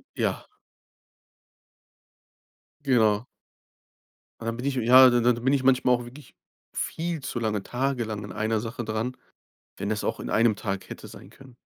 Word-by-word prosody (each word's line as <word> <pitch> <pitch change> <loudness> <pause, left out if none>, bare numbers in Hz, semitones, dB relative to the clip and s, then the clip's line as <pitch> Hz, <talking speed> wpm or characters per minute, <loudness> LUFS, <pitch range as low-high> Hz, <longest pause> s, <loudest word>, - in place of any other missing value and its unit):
Ja. - - -1 2.4
Genau. 110 -4 +3 1.2
Dann 115 0 -3
bin 125 +3 -5
ich 140 - 0
ja, 125 +2 +7
dann 120 -1 +2
dann 120 0 +2
bin 135 - +3
ich 135 -2 +2
manchmal 130 -1 +4
auch 120 0 -2
wirklich 135 +5 -13 0.4
viel 165 -1 -3
zu 130 -3 -4
lange 105 -3 -1
tagelang 120 -5 -2
an 100 - -8
einer 110 +2 -1
Sache 120 +2 -5
dran, 110 +4 -3 0.6
wenn - - -4
das - - -2
auch - - -2
in - - -5
einem 110 0 +3
Tag 100 -2 -4
hätte - - -9
sein - - -13
können. 130 -3 -16
120 Hz, 155 wpm, -26 LUFS, 110-130 Hz, 2.4 s, ja